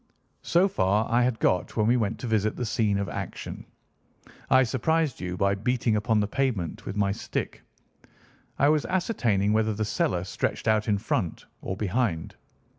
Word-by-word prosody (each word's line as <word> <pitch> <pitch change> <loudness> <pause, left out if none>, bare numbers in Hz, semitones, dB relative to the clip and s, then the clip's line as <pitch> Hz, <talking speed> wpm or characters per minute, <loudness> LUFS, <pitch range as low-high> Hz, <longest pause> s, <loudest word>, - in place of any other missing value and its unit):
"So 175 +3 +3
far 100 - +1
I 120 +1 +4
had 125 -2 +1
got 90 +4 0
when 105 - +3
we 120 +3 +4
went 110 -2 0
to - - -4
visit 110 -1 +1
the 125 - -3
scene 110 -3 +1
of 100 -1 -2
action. - - -6 0.8
I 130 0 +6
surprised 140 +4 0
you 90 0 -4
by 100 +1 +2
beating 115 +2 0
upon 105 +1 +2
the 105 - +1
pavement 115 - -2
with 95 - -4
my 100 -1 +2
stick. 100 - -4 1.0
I 140 - +4
was 150 -1 +2
ascertaining 115 - +1
whether 110 -1 +1
the 110 +1 -1
cellar 90 -4 0
stretched 90 - -3
out 110 -1 +2
in 105 -2 +2
front 95 -4 -2 0.2
or 95 - -4
behind. 100 -5 -1
110 Hz, 175 wpm, -26 LUFS, 100-125 Hz, 1.0 s, I